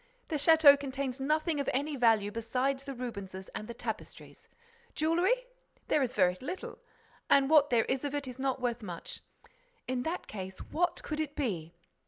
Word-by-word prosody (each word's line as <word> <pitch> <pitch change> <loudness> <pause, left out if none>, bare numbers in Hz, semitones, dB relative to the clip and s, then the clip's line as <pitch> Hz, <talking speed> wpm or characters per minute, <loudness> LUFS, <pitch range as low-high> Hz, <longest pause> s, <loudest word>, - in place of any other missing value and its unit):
The 315 - 0
château 290 -1 +7
contains 270 -1 -3
nothing 305 +3 +1
of 280 - 0
any 290 +3 -1
value 225 -5 +3
besides 255 +5 -1
the 275 -1 -7
Rubenses 200 -6 -6
and 215 - -5
the 235 - -7
tapestries. - - -7 0.5
Jewelry? 355 +11 +2 0.4
There 300 - +3
is 255 -1 -1
very 180 -3 +3
little 355 +8 -6 0.5
and 275 +1 +5
what 295 -2 +6
there 235 -2 +3
is 260 +1 -1
of 290 0 -2
it 285 -2 -3
is 250 0 -8
not 265 0 0
worth 245 -1 -1
much. 175 -5 -7 0.7
In 255 -1 -1
that 325 +6 -3
case, 190 -2 -7
what 345 +2 -1
could 305 -1 -4
it 300 -2 -2
be? 175 - -3
270 Hz, 175 wpm, -31 LUFS, 230-300 Hz, 0.7 s, château